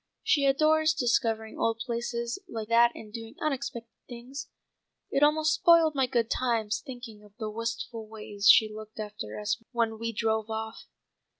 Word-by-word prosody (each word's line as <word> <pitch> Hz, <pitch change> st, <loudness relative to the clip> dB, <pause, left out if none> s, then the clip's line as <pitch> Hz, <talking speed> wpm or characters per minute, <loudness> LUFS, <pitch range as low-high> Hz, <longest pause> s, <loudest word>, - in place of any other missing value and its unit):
She 285 Hz, -3 st, +3 dB
adores 310 Hz, +3 st, +3 dB
discovering 230 Hz, -4 st, 0 dB
old 225 Hz, 0 st, +1 dB
places 235 Hz, +2 st, -3 dB
like 220 Hz, -5 st, -5 dB
that 235 Hz, +1 st, +5 dB
and 210 Hz, -1 st, -11 dB
doing 225 Hz, +2 st, -8 dB
unexpected 260 Hz, -6 st, -3 dB, 0.2 s
things. 255 Hz, +4 st, -8 dB, 0.6 s
It 275 Hz, -, +1 dB
almost 310 Hz, +1 st, +4 dB
spoiled 330 Hz, -1 st, +5 dB
my 270 Hz, -2 st, +1 dB
good 235 Hz, -2 st, +1 dB
times 225 Hz, -4 st, 0 dB
thinking 245 Hz, -6 st, -9 dB
of 205 Hz, 0 st, -19 dB
the 215 Hz, -3 st, -4 dB
wistful 230 Hz, 0 st, -4 dB
way 210 Hz, -2 st, -10 dB
she 210 Hz, +2 st, +7 dB
looked 215 Hz, +1 st, -10 dB
after 210 Hz, 0 st, -6 dB
us 210 Hz, +2 st, -1 dB
when 225 Hz, -2 st, 0 dB
we 230 Hz, 0 st, -2 dB
drove 220 Hz, 0 st, -1 dB
off." 220 Hz, 0 st, -5 dB
230 Hz, 160 wpm, -28 LUFS, 220-260 Hz, 0.6 s, she